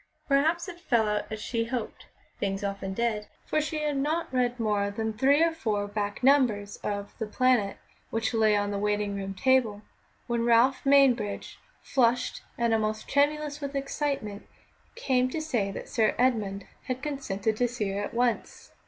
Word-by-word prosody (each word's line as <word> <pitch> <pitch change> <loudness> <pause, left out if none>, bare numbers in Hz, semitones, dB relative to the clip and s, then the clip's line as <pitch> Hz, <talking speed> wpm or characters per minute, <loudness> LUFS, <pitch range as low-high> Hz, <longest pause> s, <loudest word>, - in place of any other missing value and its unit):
Perhaps 315 +6 +2
it 350 -1 -8
fell 235 - +2
out 210 0 -2
as 220 - -4
she 230 +1 -2
hoped 235 -1 -5 0.3
(things 195 0 -2
often 195 -1 -3
did), 225 -2 -1 0.2
for 310 - +1
she 305 0 -3
had 295 -1 0
not 305 +2 -1
read 250 -1 +1
more 210 -2 +1
than 220 +2 -3
three 275 +8 +4
or 335 - +3
four 215 -10 -2
back 205 +2 -3
numbers 245 -7 +3
of 200 -1 -4
The 220 - -2
Planet, 240 -3 +2 0.3
which 225 +1 -1
lay 215 -2 +4
on 205 0 -1
the 200 - -2
waiting 205 0 0
room 195 -1 -4
table, 225 -2 +2 0.4
when 235 -1 -1
Ralph 240 +3 +4
Mainbridge, 255 -7 +3 0.2
flushed 245 -2 +1 0.2
and 235 -1 +2
almost 215 0 -1
tremulous 295 +1 +1
with 280 0 -4
excitement, 275 -7 -3 0.5
came 255 - +1
to 315 - -3
say 245 -11 -1
that 195 - -7
Sir 220 -3 +1
Edmund 215 -6 +1 0.2
had 255 0 -4
consented 220 -8 -2
to 245 - +2
see 225 -5 -3
her 200 +1 -2
at 205 - -5
once. 240 -1 -1
235 Hz, 170 wpm, -28 LUFS, 210-275 Hz, 0.5 s, three